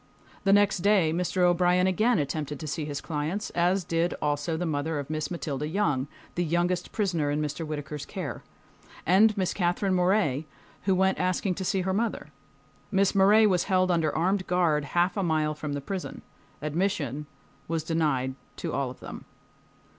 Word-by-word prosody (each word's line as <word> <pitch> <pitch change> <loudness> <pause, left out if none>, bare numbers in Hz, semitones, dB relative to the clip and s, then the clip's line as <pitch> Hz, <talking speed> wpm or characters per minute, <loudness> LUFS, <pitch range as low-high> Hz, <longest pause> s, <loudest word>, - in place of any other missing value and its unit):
The 195 - +4
next 205 -1 +4
day 185 -4 +3
Mr. 180 +1 0
O'Brien 180 +1 +4
again 215 +5 +2
attempted 145 -1 -2
to - - -6
see 150 +1 -3
his 145 -1 -4
clients, 160 +6 -3
as 180 +2 +1
did 165 +1 0
also 150 +2 -1
the 175 - -2
mother 155 0 -1
of 145 +1 -5
Miss 155 -1 -2
Matilda 150 -4 -3
Young, 150 -7 0 0.3
the 175 - 0
youngest 175 +2 0
prisoner 175 -9 0
in 145 +1 0
Mr. 155 +2 -3
Whittaker's 150 -1 -5
care, - - -5 0.6
and 205 +5 +5
Miss 185 -2 0
Katherine 185 +1 0
Morey, 180 -6 +2 0.4
who 195 -1 +3
went 190 +1 +2
asking 185 +1 0
to 190 - -5
see 190 +1 0
her 190 +1 -1
mother. 225 +3 -2 0.6
Miss 195 -1 +3
Morey 205 +3 +6
was 185 -4 +2
held 185 -2 +2
under 165 -3 +2
armed 185 +3 +1
guard 165 -5 +2
half 175 +4 +1
a 200 - 0
mile 155 -3 +1
from 150 -1 -5
the 145 - -3
prison. 190 +6 -5 0.4
Admission 150 - -1 0.4
was 165 -1 -1
denied 150 -5 0 0.2
to - - -4
all 140 -2 -1
of 125 - -11
them. - - -8
175 Hz, 175 wpm, -27 LUFS, 150-190 Hz, 0.6 s, Morey